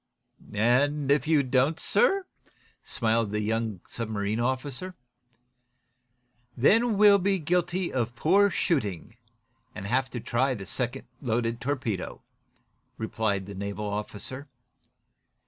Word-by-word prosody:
"And, 135 Hz, +6 st, +2 dB
if 140 Hz, 0 st, +2 dB
you 155 Hz, -3 st, +4 dB
don't, 135 Hz, +5 st, +2 dB
sir 395 Hz, -6 st, +3 dB, 0.3 s
?" -, -, -39 dB, 0.3 s
smiled 115 Hz, -1 st, 0 dB
the 105 Hz, +1 st, -1 dB
young 110 Hz, -2 st, -2 dB
submarine 110 Hz, -1 st, -2 dB, 0.2 s
skipper. 145 Hz, +8 st, -7 dB, 1.6 s
"Then 220 Hz, -, +4 dB
we'll 205 Hz, -1 st, +7 dB
be 195 Hz, +1 st, +1 dB
guilty 175 Hz, +2 st, 0 dB
of 120 Hz, -2 st, -1 dB
poor 195 Hz, +10 st, +4 dB
shooting, 110 Hz, -, -1 dB, 0.6 s
and 100 Hz, -, -6 dB
have 130 Hz, +5 st, +1 dB
to 120 Hz, -, -5 dB
try 130 Hz, +3 st, 0 dB
the 100 Hz, -4 st, -7 dB
second 125 Hz, +5 st, -3 dB, 0.2 s
loaded 115 Hz, -2 st, -1 dB
torpedo," 125 Hz, -8 st, -3 dB, 0.7 s
replied 110 Hz, -3 st, -1 dB
the 100 Hz, -, -8 dB
naval 100 Hz, +1 st, -4 dB
officer. 105 Hz, +6 st, -5 dB
125 Hz, 115 wpm, -27 LUFS, 110-155 Hz, 1.6 s, we'll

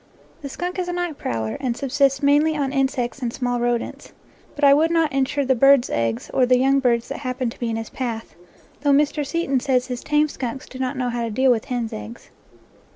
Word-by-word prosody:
The 280 Hz, -, -6 dB
skunk 355 Hz, +6 st, -4 dB
is 360 Hz, -, -2 dB
a 355 Hz, -, -3 dB
night 350 Hz, -4 st, -3 dB
prowler, 110 Hz, -1 st, -3 dB
and 245 Hz, -3 st, -2 dB
subsists 275 Hz, 0 st, +1 dB
mainly 295 Hz, +3 st, +4 dB
upon 280 Hz, -2 st, -1 dB
insects 265 Hz, -2 st, -1 dB
and 240 Hz, -2 st, -1 dB
small 245 Hz, 0 st, -2 dB
rodents; 240 Hz, 0 st, -2 dB, 0.4 s
but 290 Hz, -, -7 dB
I 280 Hz, -1 st, +8 dB
would 310 Hz, +3 st, +3 dB
not 330 Hz, -3 st, +2 dB
insure 275 Hz, +1 st, 0 dB
the 260 Hz, -, +3 dB
birds' 275 Hz, 0 st, +4 dB
eggs 115 Hz, +1 st, -2 dB
or 255 Hz, -2 st, +3 dB
the 250 Hz, 0 st, +5 dB
young 270 Hz, +2 st, +3 dB
birds 235 Hz, -3 st, +1 dB
that -, -, -5 dB
hap 255 Hz, -2 st, -4 dB
pen 250 Hz, -3 st, -1 dB
to -, -, -14 dB
be 235 Hz, -, -2 dB
in 225 Hz, -, -2 dB
his 225 Hz, 0 st, -5 dB
path, 235 Hz, -4 st, -5 dB, 0.5 s
though 290 Hz, -, +1 dB
Mr. 295 Hz, +1 st, +2 dB
Seton 280 Hz, -3 st, 0 dB
says 255 Hz, -1 st, +1 dB
his 250 Hz, -1 st, -5 dB
tame 300 Hz, 0 st, +2 dB
skunks 260 Hz, -2 st, -6 dB
do 255 Hz, -, -10 dB
not 260 Hz, +1 st, -2 dB
know 250 Hz, -1 st, -1 dB
how 240 Hz, 0 st, -2 dB
to 230 Hz, -, -2 dB
deal 260 Hz, +4 st, +3 dB
with 225 Hz, -3 st, 0 dB
hen's 245 Hz, -4 st, -3 dB
eggs. 105 Hz, +2 st, -9 dB
265 Hz, 230 wpm, -22 LUFS, 240-285 Hz, 0.5 s, I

